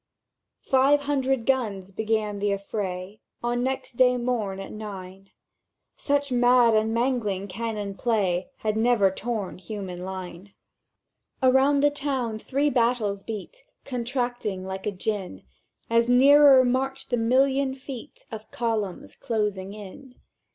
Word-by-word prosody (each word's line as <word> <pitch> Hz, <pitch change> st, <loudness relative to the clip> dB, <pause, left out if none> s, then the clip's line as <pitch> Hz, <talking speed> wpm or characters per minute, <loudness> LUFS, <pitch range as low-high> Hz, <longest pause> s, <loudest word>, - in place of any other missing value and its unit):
"—Five 275 Hz, +2 st, +4 dB
hundred 270 Hz, -4 st, 0 dB
guns 210 Hz, -8 st, -1 dB
began 215 Hz, 0 st, -1 dB
the 205 Hz, 0 st, 0 dB
affray 195 Hz, -1 st, -4 dB, 0.2 s
On 240 Hz, 0 st, 0 dB
next 260 Hz, -1 st, -3 dB
day 250 Hz, -1 st, +5 dB
morn 230 Hz, -6 st, -2 dB
at 195 Hz, -, -7 dB
nine; 195 Hz, -2 st, -9 dB, 0.7 s
Such 285 Hz, -1 st, -1 dB
mad 245 Hz, -1 st, +5 dB
and 220 Hz, 0 st, +2 dB
mangling 230 Hz, -5 st, -1 dB
cannon 210 Hz, 0 st, -4 dB
play 195 Hz, -4 st, 0 dB
Had 215 Hz, -1 st, -1 dB
never 220 Hz, -4 st, +3 dB
torn 205 Hz, -2 st, -4 dB
human 185 Hz, -2 st, -6 dB
line. 190 Hz, 0 st, -8 dB, 0.9 s
"Around 265 Hz, +2 st, +4 dB
the 290 Hz, -, +5 dB
town 265 Hz, -6 st, -2 dB
three 285 Hz, +5 st, 0 dB
battles 230 Hz, -5 st, +1 dB
beat, 225 Hz, -, -8 dB, 0.2 s
Contracting 245 Hz, -6 st, -3 dB
like 190 Hz, +1 st, -5 dB
a -, -, +1 dB
gin; 195 Hz, -, -4 dB, 0.4 s
As 230 Hz, +1 st, +2 dB
nearer 270 Hz, +1 st, +7 dB
marched 265 Hz, +2 st, -1 dB
the 245 Hz, -, +2 dB
million 265 Hz, +3 st, +2 dB
feet 265 Hz, -3 st, -10 dB
Of 220 Hz, -1 st, -8 dB
columns 220 Hz, -6 st, -3 dB
closing 210 Hz, -5 st, -3 dB
in. 230 Hz, +6 st, -11 dB
230 Hz, 125 wpm, -25 LUFS, 200-260 Hz, 0.9 s, nearer